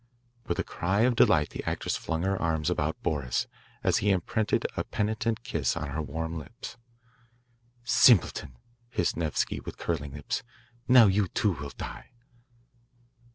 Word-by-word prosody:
With - - -1
a - - 0
cry 95 +5 -1
of 125 +1 +3
delight 80 -8 +4
the - - -6
actress - - -2
flung 80 +1 -2
her 95 +1 +1
arms 80 0 0
about 80 -2 -2
Boris, 70 -6 0 0.4
as - - +3
he 105 - +1
imprinted 100 +3 +1
a - - -1
penitent 110 +2 -1
kiss 80 - -1
on 75 -3 -3
her 75 +3 -2
warm 80 +2 -4
lips. 115 +10 -9 1.1
"Simpleton," 120 - +4 0.3
hissed 90 -8 0
Nevsky 80 -3 -1
with - - -8
curling 75 -5 -3
lips. 75 +8 -3 0.5
"Now 125 -2 +8
you, 100 0 +3
too, 105 +4 +1
will 70 -2 -6
die." - - -7
85 Hz, 150 wpm, -28 LUFS, 75-105 Hz, 1.1 s, Now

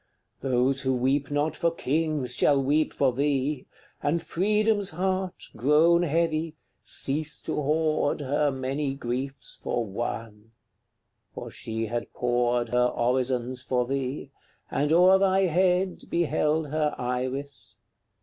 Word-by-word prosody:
Those 130 +1 +1
who 130 -1 +1
weep 135 +3 +1
not 145 +2 0
for 170 - +1
kings 155 -4 -1
shall 140 +2 +4
weep 145 +3 +1
for 135 -3 +1
thee, 140 0 0 0.3
And 160 +3 0
Freedom's 210 +4 +1
heart, 185 +2 -2
grown 155 +8 +4
heavy, 165 -1 0 0.3
cease 150 +2 -3
to - - -3
hoard 155 0 +1
Her 145 +2 +1
many 135 +1 -2
griefs 135 +1 -5
for 120 - -1
One; 110 +1 -5 0.8
for - - -7
she 110 0 -4
had 120 +2 -4
poured 120 -1 +1
Her 125 +1 +3
orisons 125 +1 0
for 125 -1 0
thee, 135 +1 -3 0.4
and 145 +2 0
o'er 180 +3 +6
thy 190 0 +3
head 185 +1 +2
Beheld 155 -2 +1
her 155 -1 0
Iris. 130 +3 -4
140 Hz, 125 wpm, -26 LUFS, 125-160 Hz, 0.8 s, o'er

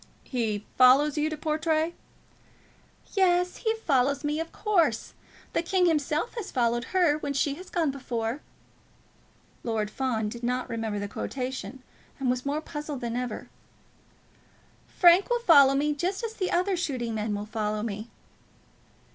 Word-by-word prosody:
"He 220 -5 -2
follows 270 +4 +6
you 305 0 +1
to 310 - -5
Portray? 315 +2 0 1.2
"Yes; 360 -2 +2
he 445 -1 0
follows 280 - +1
me, 295 +1 -1
of 325 0 -4
course. 335 - +1 0.4
'The - - +2
king 360 +2 +2
himself 310 +4 0
has 450 -4 -5
followed 240 -2 0
her, 345 -5 +2
When 285 -2 -3
she 275 +1 +1
has 360 +6 -10
gone 325 -5 +1
before.'" 245 -1 -3 1.2
Lord 215 -2 -1
Fawn 235 -5 -1
did 235 +3 -7
not 250 +1 -1
remember 225 -2 -3
the 205 0 -3
quotation, 260 +3 -5 0.4
and 260 -2 +1
was 250 +2 -3
more 295 +2 -1
puzzled 295 -3 -6
than 235 -1 -3
ever. 245 -3 -4 1.4
"Frank 355 +4 +5
will 480 0 +1
follow 280 - +7
me, 295 +2 +1
just 365 +9 -2
as 450 -1 -3
the 375 -4 -2
other 370 +2 +1
shooting 255 -9 -2
men 215 -1 -2
will 205 0 -4
follow 215 -1 -2
me." 215 +1 -5
280 Hz, 150 wpm, -27 LUFS, 235-335 Hz, 1.4 s, follow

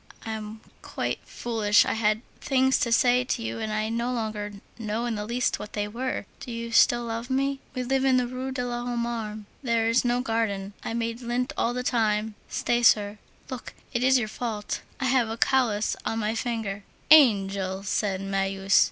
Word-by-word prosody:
I 225 - -3
am 215 0 -6 0.2
quite - - -3
foolish. 220 -3 +2
I - - 0
had 220 0 +1 0.2
things 265 -1 +2
to 235 - 0
say 245 +2 +4
to 245 - -2
you, 115 0 -3
and 215 - -3
I 215 +1 -1
no 235 +2 -1
longer 215 -3 -3 0.3
know 220 +1 -2
in 240 - -1
the 210 -1 -4
least 245 +2 0
what 210 - -8
they 205 -1 -1
were. 245 +1 -3
Do 245 - -7
you 230 0 -5
still 240 +1 +5
love 230 +1 -4
me? 275 +1 0 0.2
We 255 - -1
live 265 +1 +1
in 265 -1 +4
the 250 - +2
Rue 255 +2 -4
de 250 -1 -2
l'Homme 240 0 -2
Armé. 215 -3 -4 0.2
There 230 -3 +1
is 230 +2 +3
no 245 0 +1
garden. 220 -5 -1
I 225 - -3
made 230 +1 -2
lint 245 +1 -1
all 240 - 0
the 250 - -2
time; 220 -3 +1 0.2
stay, 240 0 0
sir, 210 -2 +4 0.3
look, 250 -3 -7 0.2
it 240 0 0
is 260 0 +5
your 230 -3 0
fault, 215 -1 -4 0.2
I 265 - -1
have 255 -3 +3
a 225 - -4
callous 230 -5 +2
on 225 - -2
my 215 0 0
fingers." 225 -4 -3 0.3
"Angel!" 195 -9 +5
said 195 -1 -1
Marius. 195 0 +2
230 Hz, 195 wpm, -26 LUFS, 210-245 Hz, 0.3 s, still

